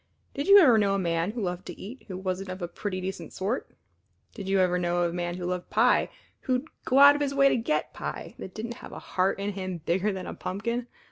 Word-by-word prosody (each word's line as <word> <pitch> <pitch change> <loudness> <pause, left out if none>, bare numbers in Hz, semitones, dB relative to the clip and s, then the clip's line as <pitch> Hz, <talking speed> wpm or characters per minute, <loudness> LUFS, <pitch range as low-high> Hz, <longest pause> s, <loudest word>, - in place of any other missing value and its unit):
Did 280 - -3
you 400 +1 +9
ever 255 - +7
know 200 -1 +2
a - - +1
man 170 -1 0
who 230 -3 -3
loved 180 -1 -4
to - - -8
eat 235 +7 -9
who 185 -3 -5
wasn't 190 0 -3
of 185 +1 -5
a - - -1
pretty 185 +2 -4
decent 190 +1 -5
sort? 205 +7 -2 0.6
Did 195 -3 -6
you 195 0 +3
ever 180 -1 +2
know 175 0 +1
of 170 - 0
a - - -8
man 175 0 -2
who 180 - -5
loved 180 0 -3
pie - - +3 0.3
who'd 255 +1 -1 0.2
go 260 - +2
out 285 +1 +10
of 290 - -3
his 280 -1 -1
way 275 0 +6
to - - +2
get 245 +6 -1
pie - - -6
that 190 - -8
didn't 230 +2 -4
have - - -10
a - - -7
heart 185 +1 0
in 200 +1 -2
him 185 -2 -4
bigger 190 +5 +1
than 190 -1 -5
a - - -5
pumpkin? 235 +6 -3
195 Hz, 255 wpm, -27 LUFS, 180-235 Hz, 0.6 s, out